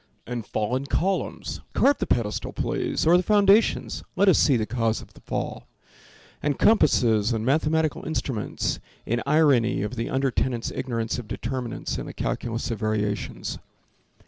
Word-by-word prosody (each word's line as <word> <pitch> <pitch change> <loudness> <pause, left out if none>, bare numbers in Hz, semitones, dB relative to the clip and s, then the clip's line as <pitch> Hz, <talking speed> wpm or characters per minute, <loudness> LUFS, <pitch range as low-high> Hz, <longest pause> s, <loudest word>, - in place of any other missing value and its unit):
And 120 -3 -5
fallen 125 +6 -1
columns! 190 +6 -1
Carve 280 +1 +3
the - - -2
pedestal, 110 -3 -1
please, - - -1
Or 170 +2 +6
the - - +2
foundations; 205 +2 +3
let 195 +1 +4
us 180 - +5
see 135 -4 +4
the 110 - 0
cause 115 0 0
of - - -13
the - - -17
fall. - - -4 0.7
And 145 -2 0
compasses 120 - +4
and 110 0 -2
mathematical 155 +3 +1
instruments, 135 -8 -2 0.3
In 120 +1 0
irony 140 -8 +3
of 105 +4 -4
the 115 - -2
under 135 0 +1
tenants, 120 -1 -1
ignorance 115 -2 -2
Of 120 - -8
determinants 125 0 -4
and - - -6
the - - -8
calculus 115 0 -3
of 115 - -3
variations. 105 -2 -2
125 Hz, 155 wpm, -25 LUFS, 115-155 Hz, 0.7 s, Or